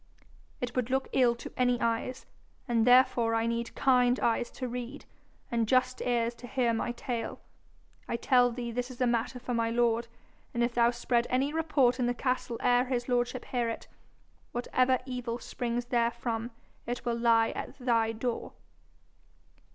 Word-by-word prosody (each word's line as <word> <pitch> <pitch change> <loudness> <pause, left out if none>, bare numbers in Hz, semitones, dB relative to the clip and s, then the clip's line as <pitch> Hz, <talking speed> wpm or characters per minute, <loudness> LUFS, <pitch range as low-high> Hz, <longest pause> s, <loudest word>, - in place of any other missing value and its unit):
'It 245 -1 -4
would 250 -1 0
look 265 +1 0
ill 245 -3 +4
to 235 - -9
any 245 -1 +2
eyes, 230 +2 -1 0.4
and 235 -1 +2
therefore 245 -2 +5
I 225 0 +1
need 235 0 -2
kind 250 -2 +3
eyes 235 +1 +1
to 255 - -5
read, 250 +3 -6 0.5
and 230 -2 +1
just 255 +1 +2
ears 235 -1 +1
to 245 - -8
hear 245 -2 +1
my 225 +1 -1
tale. 240 -1 -4 0.7
I - - -1
tell 245 +1 +3
thee 235 0 -4
this 245 +2 -3
is 255 - -11
a 255 - +3
matter 235 +1 0
for 245 0 -4
my 230 -1 +1
lord, 235 0 +1 0.5
and 235 - +2
if 240 0 0
thou 235 0 +4
spread 240 0 0
any 270 +4 +1
report 280 -6 +2
in 245 - +2
the 245 - 0
castle 250 -2 -1
ere 245 0 +3
his 245 -2 -2
lordship 245 0 0
hear 240 -2 -1
it, 225 - -6 0.7
whatever 255 +1 +2
evil 250 -2 -4
springs 240 0 -3
therefrom 235 -1 -1 0.4
it 245 0 -4
will 240 -1 0
lie 230 -1 +3
at - - -6
thy 230 -4 +1
door.' 230 +1 -3
240 Hz, 170 wpm, -30 LUFS, 235-250 Hz, 0.7 s, therefore